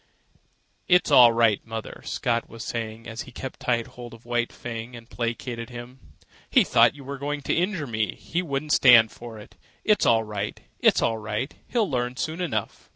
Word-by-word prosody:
"It's 180 -3 +4
all 125 -4 +8
right, 115 -3 +2
mother," 115 -1 -7
Scott 115 -1 -1
was 115 -1 -8
saying 115 -1 -5
as 115 0 -6
he 130 - -10
kept 130 +1 -7
tight 120 -2 0
hold 120 -1 -11
of 115 - -19
White 120 0 -1
Fang 115 0 -7
and 115 -1 -12
placated 115 0 -4
him. 120 +1 -10 0.5
"He - - +5
thought - - +4
you 140 - -11
were 140 +1 -6
going 145 +1 -3
to - - -1
injure 180 -2 0
me, 110 -4 -1
and - - -21
he 170 - -3
wouldn't 150 -2 -2
stand 120 -4 +7
for 115 -2 -10
it. 105 - -14 0.3
It's 210 -1 +3
all 115 -1 +4
right. 105 -1 -5 0.2
It's - - +4
all 115 -1 0
right. 110 +5 -3
He'll 230 -4 +1
learn 125 -2 -2
soon 160 +5 -3
enough." 110 - -3
120 Hz, 195 wpm, -25 LUFS, 115-140 Hz, 0.5 s, all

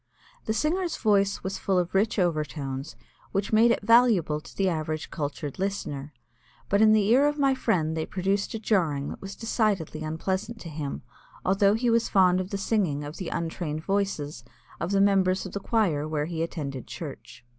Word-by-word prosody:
The 220 - 0
singer's 335 +7 0
voice 200 -2 +2
was 190 +1 -3
full 190 -2 +1
of 180 -1 0
rich 205 +4 +2
overtones 150 -5 -2 0.4
which 195 +2 -1
made 225 +2 +6
it 235 - +1
valuable 215 -10 +4
to - - -15
the 195 - +2
average 155 -3 -2
cultured 145 -1 -4
listener, 150 -8 -3 0.6
but 200 +1 +3
in 220 0 +7
the 215 -2 +4
ear 265 +5 +5
of 295 0 -1
my 275 -2 +3
friend 170 -11 0
they 160 -1 -2
produced 195 +2 -1
a - - -3
jarring 165 -10 0
that - - -8
was 195 0 -7
decidedly 210 -9 -1
unpleasant 190 +8 -3
to 170 - -7
him, 150 -2 -5 0.4
although 195 +2 +4
he 235 +1 +1
was 230 0 +2
fond 185 -2 +4
of 185 - -6
the 200 - -2
singing 195 -8 0
of 145 +2 -7
the 185 - -4
untrained 160 -2 -3
voices 195 -7 -2 0.4
of 170 - -2
the 195 0 +3
members 190 -2 +3
of - - -6
the 200 - -3
choir 185 -9 +1
where 150 -1 -1
he 165 0 -4
attended 140 -6 -4
church. 135 -6 -9
190 Hz, 190 wpm, -27 LUFS, 155-210 Hz, 0.6 s, in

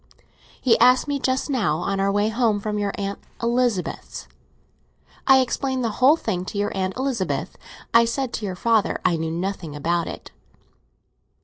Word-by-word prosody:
He 235 -3 +3
asked 250 +3 +5
me 285 -1 -1
just 260 0 0
now, 220 - 0
on 195 +3 -2
our 195 0 +2
way 205 +2 +1
home 220 -2 +1
from 210 0 -3
your 205 -1 -1
Aunt 200 0 -4 0.2
Elizabeth's. 235 -5 -1 1.0
I 265 -1 +7
explained 260 0 -1
the 230 - 0
whole 275 +5 +7
thing 195 - -3
to 205 - -6
your 205 0 -1
Aunt 190 +1 -2
Elizabeth. 255 -7 -2 0.4
I 230 0 +6
said 245 +2 -2
to 215 - -3
your 185 - -4
father 225 +2 +1
I 170 - +3
know 160 0 -2
nothing 170 -2 -4
about 170 +3 -1
it." - - -8
215 Hz, 170 wpm, -23 LUFS, 190-250 Hz, 1.0 s, I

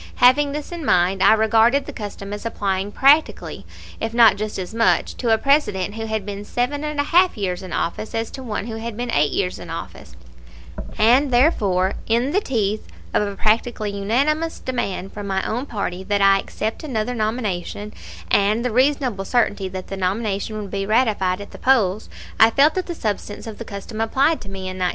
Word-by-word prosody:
Having 280 +4 +4
this 300 +2 -5
in 340 -2 -6
mind, 185 -4 +2
I - - +7
regarded 225 +5 +3
the - - -8
custom 205 -1 -7
as 205 - -6
applying 200 -3 -2
practically, 285 +7 +2 0.3
if 225 +1 -3
not 230 -3 +7
just 215 +1 -4
as 190 +2 -5
much, 230 0 +2
to 235 -3 0
a 220 - +5
President 220 -8 +1
who 225 0 -5
had 220 -2 -2
been 205 0 -6
seven 250 +7 -2
and 300 -1 -3
a - - +3
half 355 +2 +3
years 185 -3 -2
in 185 -2 -9
office 170 +7 -3
as 225 0 -2
to 265 - -8
one 215 -5 -4
who 225 -1 -5
had 225 -1 -6
been 245 0 -3
eight 145 -5 +2
years 180 -2 -1
in - - -9
office, - - -8 0.8
and 250 +6 +4
therefore, 205 - +2
in 235 +5 +1
the 400 +5 +2
teeth 215 - -1 0.3
of - - +3
a 200 - -5
practically 215 0 0
unanimous 280 +11 0
demand 195 -7 -4
from 205 -1 -6
my 190 -1 -1
own 245 +6 -3
party 190 -5 -4
that 205 +1 0
I 195 0 +5
accept 220 +6 -4
another 250 -4 -2
nomination, 215 -3 -3 0.4
and 210 +4 +2
the 250 - 0
reasonable 255 -4 +1
certainty 205 -4 0
that 185 0 -7
the 195 - -5
nomination 200 +2 -2
would 200 -2 -7
be 195 -1 -2
ratified 210 -5 +1
at 200 - -10
the - - -11
polls, 220 -6 +2 0.3
I 225 - +8
felt 280 +6 +4
that 370 -1 -3
the 345 - -4
substance 210 -4 -4
of 220 -2 -8
the 230 - -6
custom 215 +2 -6
applied 270 +8 +2
to 195 - -10
me 195 0 -7
in 185 0 -5
1908. 180 -1 +1
220 Hz, 200 wpm, -21 LUFS, 200-250 Hz, 0.8 s, I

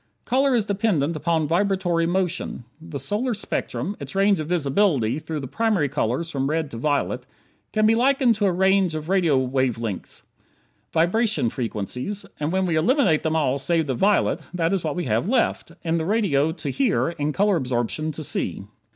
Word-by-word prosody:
Color 265 +1 +2
is 225 -4 +2
dependent 195 -7 0
upon 160 0 0
vibratory 175 -1 +1
motion. 180 -7 -2 0.2
The 165 -3 -6
solar 210 - -1
spectrum 205 0 -3
its 140 +2 -7
range 195 -1 +3
of 155 - -4
visibility 145 - +1
through 155 -1 -5
the 135 - -5
primary 215 - +1
colors 130 +9 -1
from 135 -2 -1
red 155 -1 -1
to 115 - -6
violet 135 -1 -1 0.4
can 215 0 +2
be 220 - +5
likened 255 +1 +3
to 205 -2 +2
a - - +3
range 190 -1 +2
of 155 +1 -5
radio 175 -7 +3
wave 130 -2 0
lengths; 110 -5 -5 0.7
vibration 175 - +2
frequencies; 125 - -4
and 150 +1 -1
when 190 0 +1
we 170 -3 0
eliminate 175 - +3
them 160 0 -1
all 140 -3 +1
save 165 +3 +1
the 135 - -1
"violet" 200 - +2
that 170 +1 +1
is 190 - 0
what 155 -3 -2
we 180 - -2
have 115 - 0
left, 245 -2 0
in 165 -1 0
the 160 - -2
radio 170 -8 +2
to 165 - -4
hear, 255 -11 +1
in 150 -3 -2
color 200 +5 +2
absorption 130 +2 -1
to 155 +1 -7
see. 95 - -2
165 Hz, 185 wpm, -23 LUFS, 140-200 Hz, 0.7 s, be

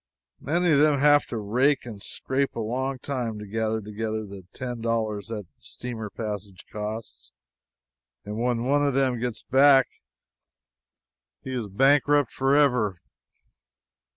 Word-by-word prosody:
Many 170 +3 +1
of 140 - +5
them 150 -1 +4
have 145 +1 +5
to 120 - -4
rake 125 +7 +1
and 110 -4 -8
scrape 135 +5 -2
a - - -4
long 130 +4 -2
time 125 -4 -3
to 105 - -7
gather 110 +1 -1
together 110 +1 -4
the 95 -2 -11
ten 125 -2 -6
dollars 110 -3 -1
their 110 -2 -5 0.2
steamer 115 -4 -7
passage 100 -3 -6
costs, 105 - -6 0.9
and 105 +2 -5
when 120 -1 0
one 145 +2 +2
of 140 -2 +1
them 130 -3 +1
gets 120 -1 -4
back 135 0 +6 1.6
he 130 - -6
is 125 -4 -2
a - - -10
bankrupt 145 +5 +3
forever 135 -6 +3
after. 85 - -30
120 Hz, 145 wpm, -26 LUFS, 110-135 Hz, 1.6 s, back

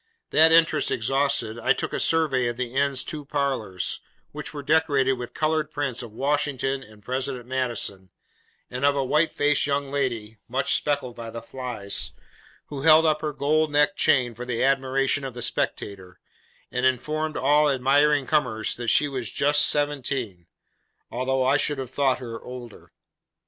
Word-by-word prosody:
That 160 +1 +6
interest 165 -2 +4
exhausted, 135 -1 0
I - - +3
took - - -4
a - - -1
survey 145 -7 +1
of 120 0 -3
the 125 -1 -4
inn's 140 -1 +1
two 155 -2 -5
parlours, 135 -10 -2 0.3
which - - -7
were 145 -1 -7
decorated 145 -3 +2
with 125 -2 -7
coloured 155 -1 0
prints 140 -5 -3
of 120 -3 -9
Washington, 135 +1 -1
and 110 -5 -16
President 130 +1 -3
Madison, 120 -7 -3 0.6
and 125 +1 -6
of 140 0 +4
a 135 -1 0
white 150 +5 +2
faced 145 0 +1
young 140 -1 -1
lady 115 -6 -2
(much 125 - 0
speckled 140 -5 -1
by 115 -1 -7
the 115 - -6
flies), 120 -5 -4 0.6
who 140 -2 -5
held 160 +2 +6
up 155 -1 +2
her 155 - -2
gold 150 +2 +1
neck 145 0 +3
chain 125 -5 +3
for 120 +2 -8
the 125 -1 -2
admiration 135 +1 +1
of 130 -3 -6
the 120 - -4
spectator, 95 -3 -3 0.5
and 125 0 -2
informed 155 +5 0
all 150 +2 +3
admiring 140 +2 +3
comers 125 -8 0
that 120 -1 -5
she 145 - +4
was 130 -5 -4
'Just 145 +1 +3
Seventeen:' 135 - -1 0.6
although 130 +1 0
I 135 +3 +4
should 145 0 0
have 130 -2 -6
thought 135 -1 +1
her 115 -3 -7
older. 125 -3 -10
135 Hz, 165 wpm, -25 LUFS, 125-145 Hz, 0.6 s, That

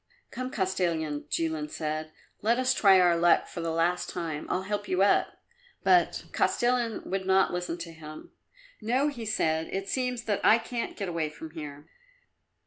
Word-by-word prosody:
"Come, 255 0 -4
Kostilin," 170 - -1
Jilin 160 -2 -1
said; 155 0 -4 0.3
"let 230 +3 +2
us 255 +1 +2
try 195 -5 +6
our 175 -1 +5
luck 170 0 +4
for 170 - -7
the 165 - -2
last 170 +2 0
time; 165 -4 -4
I'll 185 - 0
help 205 +1 -3
you 185 +1 +2
up." 200 - +2 0.5
But 360 -1 +3
Kostilin 240 -2 +1
would 190 0 -3
not 190 -1 +3
listen 175 -1 -3
to 170 -1 -7
him. 155 -1 -11 0.5
"No," 255 +7 +1
he 235 -6 -6
said; 160 -6 0
"it 195 0 -4
seems 250 0 -2
that 210 -4 -1
I 220 - +7
can't 235 0 -4
get 200 - -3
away 165 -3 -1
from 155 +1 -10
here. 150 -2 -8
180 Hz, 170 wpm, -28 LUFS, 160-220 Hz, 0.5 s, I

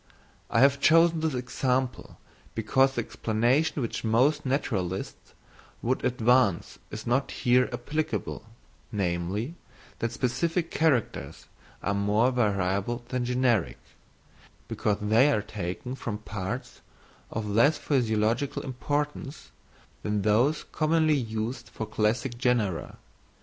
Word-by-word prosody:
I 115 - +3
have 140 +1 +5
chosen 165 +2 +5
this 160 -3 -1
example 125 0 -2 0.4
because 130 +5 +2
the 120 - +1
explanation 120 +8 0
which 115 - -4
most 130 +7 +2
naturalists 95 -9 -2 0.5
would 130 +2 0
advance 120 -5 +2
is - - -7
not 130 +4 +1
here 125 0 +2
applicable, 145 +6 -3 0.5
namely, 100 - -2 0.5
that 115 - -1
specific 165 +8 -1
characters 120 - 0 0.4
are 100 - 0
more 105 +5 +2
variable 100 0 0
than 125 -1 -1
generic, 125 -5 +1 0.9
because 105 -1 0
they 115 +7 +4
are 105 -7 +1
taken 100 +6 -5
from 115 -5 -4
parts 105 -3 -6 0.5
of 110 -1 -4
less 115 +9 +4
physiological 115 0 0
importance 145 +2 -3 0.5
than 105 -1 -1
those 120 +9 +2
commonly 155 0 +2
used 115 -2 -3
for 110 - -5
classing 110 +4 0
genera. 115 -9 0
120 Hz, 110 wpm, -27 LUFS, 105-135 Hz, 0.9 s, have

